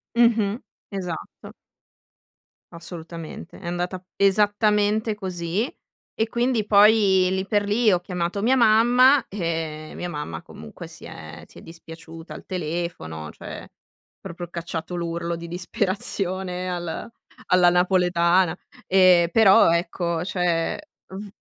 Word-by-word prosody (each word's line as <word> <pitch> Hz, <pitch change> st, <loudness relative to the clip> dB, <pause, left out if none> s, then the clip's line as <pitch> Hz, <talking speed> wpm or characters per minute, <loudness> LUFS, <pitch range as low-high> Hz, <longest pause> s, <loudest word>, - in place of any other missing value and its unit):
Mh-mh. 230 Hz, -2 st, +3 dB, 0.3 s
Esatto. 180 Hz, -5 st, -7 dB, 1.2 s
Assolutamente, 170 Hz, 0 st, -9 dB
è 175 Hz, -, -9 dB
andata 180 Hz, +1 st, -3 dB
esattamente 210 Hz, +2 st, +2 dB
così 190 Hz, -, -3 dB, 0.4 s
e 220 Hz, -, -1 dB
quindi 240 Hz, -3 st, 0 dB
poi 205 Hz, -3 st, +5 dB
lì 190 Hz, 0 st, -1 dB
per 205 Hz, 0 st, 0 dB
lì 215 Hz, +2 st, +3 dB
ho 180 Hz, -, +3 dB
chiamato 180 Hz, +1 st, -3 dB
mia 245 Hz, +5 st, +3 dB
mamma 245 Hz, +4 st, +5 dB
e 160 Hz, -5 st, -4 dB
mia 180 Hz, -, -5 dB
mamma 115 Hz, -, -5 dB
comunque 75 Hz, -, -11 dB
si -, -, -13 dB
è -, -, -10 dB
si -, -, -17 dB
è -, -, -11 dB
dispiaciuta 165 Hz, 0 st, -11 dB
al -, -, -11 dB
telefono, 155 Hz, -, -4 dB
cioè -, -, -10 dB, 0.5 s
proprio 175 Hz, +1 st, -7 dB
cacciato 170 Hz, 0 st, -5 dB
l'urlo 170 Hz, 0 st, -3 dB
di 170 Hz, 0 st, -8 dB
disperazione 185 Hz, 0 st, -2 dB
al 175 Hz, +5 st, -5 dB, 0.4 s
alla 180 Hz, -1 st, +5 dB
napoletana. 180 Hz, 0 st, +2 dB, 0.3 s
E 180 Hz, -2 st, +5 dB
però 210 Hz, -6 st, +6 dB
ecco, 170 Hz, 0 st, -1 dB
cioè 180 Hz, -3 st, -1 dB, 0.3 s
v 195 Hz, +2 st, -8 dB
180 Hz, 120 wpm, -23 LUFS, 170-205 Hz, 1.2 s, però